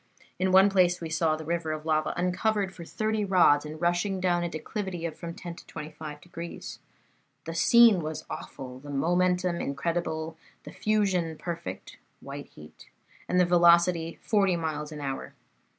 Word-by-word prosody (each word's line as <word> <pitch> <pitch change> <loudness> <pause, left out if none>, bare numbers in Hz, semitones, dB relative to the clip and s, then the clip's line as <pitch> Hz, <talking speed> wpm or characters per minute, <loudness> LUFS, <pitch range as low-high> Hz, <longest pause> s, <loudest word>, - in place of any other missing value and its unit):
In 185 0 +2
one 190 +1 +7
place 180 -3 +3
we 165 -2 -6
saw 160 -1 +2
the 155 0 -8
river 170 -1 -1
of 155 0 -5
lava 155 -1 +1
uncovered 190 +2 0
for 170 - -9
thirty 215 +4 -1
rods 170 -7 +4
and 155 +1 -8
rushing 175 +3 0
down 175 -1 +1
a 175 - -1
declivity 175 +2 -4
of 160 -2 -4
from 170 0 -7
ten 175 -3 -7
to - - -13
twenty 150 +1 -7
five 150 -1 -8
degrees. 170 -1 -8 0.7
The 165 - -5
scene 220 +3 +6
was 155 0 -5
awful, 130 -2 -8
the 145 +2 -11
momentum 180 +4 +1
incredible, 160 +2 -2 0.3
the - - -9
fusion 190 -7 0
perfect 170 0 -6 0.2
(white 140 +1 -8
heat), 75 0 -15 0.4
and 180 - +3
the 180 - +5
velocity 170 -1 +4
forty 195 -4 +2
miles 155 -2 -3
an 150 -1 -7
hour. 135 -1 -5
170 Hz, 165 wpm, -28 LUFS, 155-185 Hz, 0.7 s, one